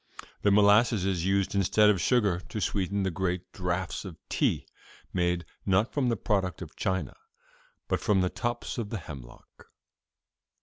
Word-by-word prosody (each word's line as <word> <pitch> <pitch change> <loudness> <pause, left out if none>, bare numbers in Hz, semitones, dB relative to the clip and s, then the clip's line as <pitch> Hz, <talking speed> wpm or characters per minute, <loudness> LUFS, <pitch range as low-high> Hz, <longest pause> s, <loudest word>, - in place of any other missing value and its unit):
The 105 - +3
molasses 105 0 +5
is 95 -2 0
used 100 0 +1
instead 105 +2 +4
of 95 -4 -1
sugar 105 -8 +2
to 110 - -4
sweeten 100 -1 -1
the 95 - 0
great 90 0 -2
draughts 90 0 -2
of 90 -5 -8
tea - - +1 0.5
made, 90 -1 0 0.2
not 100 +4 +2
from 135 -4 +1
the 115 - 0
product 95 -6 -1
of - - -12
China, 95 0 -2 0.7
but - - 0
from 100 -3 +2
the 90 - +1
tops 120 0 -3
of 110 -3 -3
the 110 - -3
hemlock. 70 - -12
95 Hz, 160 wpm, -28 LUFS, 90-105 Hz, 0.7 s, molasses